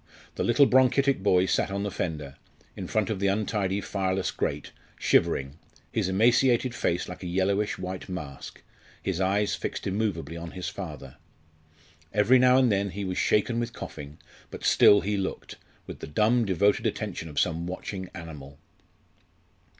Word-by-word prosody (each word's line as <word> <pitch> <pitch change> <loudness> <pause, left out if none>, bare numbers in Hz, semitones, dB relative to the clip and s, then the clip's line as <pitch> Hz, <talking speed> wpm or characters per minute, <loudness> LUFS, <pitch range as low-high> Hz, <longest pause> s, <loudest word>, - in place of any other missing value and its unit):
The - - -2
little 120 +4 +5
bronchitic 130 -1 +3
boy 95 -2 +3
sat 95 - +1
on 100 +1 -2
the 105 - -3
fender, 75 -6 -4 0.4
in - - -6
front 110 -1 0
of 100 - -2
the 100 - +1
untidy 100 -1 0
fireless 95 -2 -1
grate, - - -3 0.3
shivering, 70 +3 +1 0.3
his - - 0
emaciated 120 +4 +3
face 90 -6 -1
like 90 - -8
a 90 - -5
yellowish 100 +3 0
white 95 +1 -6
mask, 75 -7 -7 0.4
his 95 -1 -2
eyes 100 +2 +1
fixed - - -4
immovably 95 -6 -2
on 85 0 -7
his 90 - -3
father. 75 -9 -8 0.9
Every 115 +5 +4
now 125 0 +5
and 130 -3 +4
then 100 0 +1
he 100 +2 -5
was 90 -1 -2
shaken 115 +3 +2
with 120 0 -3
coughing, 75 -6 -8 0.3
but - - -9
still 100 - +6
he 100 +3 -1
looked 95 -1 -4 0.3
with - - -9
the - - -7
dumb 110 +9 +2
devoted 100 +1 +2
attention 80 - -4
of 75 - -2
some 85 0 0
watching 95 +1 -6
animal. 75 -5 -9
95 Hz, 160 wpm, -27 LUFS, 85-105 Hz, 0.9 s, still